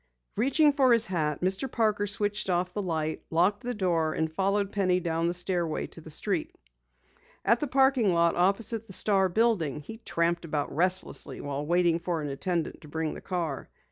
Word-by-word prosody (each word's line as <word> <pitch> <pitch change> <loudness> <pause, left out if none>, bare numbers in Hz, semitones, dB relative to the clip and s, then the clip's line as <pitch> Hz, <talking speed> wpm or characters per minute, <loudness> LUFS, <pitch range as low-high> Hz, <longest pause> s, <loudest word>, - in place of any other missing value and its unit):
Reaching 285 +6 +3
for 265 -3 +4
his 230 -1 +5
hat, 155 -7 -1
Mr. 190 +8 -1
Parker 210 -3 +1
switched 205 0 0
off 180 0 0
the 210 - -2
light, 160 -4 -2
locked 180 +6 +2
the 245 0 -4
door, 170 -5 0
and 160 0 -2
followed 200 +3 0
Penny 185 -3 +1
down 165 -1 -1
the 175 - 0
stairway 175 -2 -1
to - - -12
the - - -12
street. - - -1 0.9
At 230 +4 +4
the 295 - -2
parking 265 -5 +3
lot 170 -1 +3
opposite 205 +5 0
the 190 - -5
Star 195 -1 +3
building, 175 - +1
he 225 +9 -9
tramped 170 -5 -1
about 150 -4 -3
restlessly 185 +3 0
while 145 +1 -4
waiting 170 0 +2
for 170 -1 -2
an 145 - -3
attendant 165 +4 -3
to 150 - -13
bring 160 +1 -3
the - - -9
car. 170 -7 -4
180 Hz, 185 wpm, -28 LUFS, 165-210 Hz, 0.9 s, his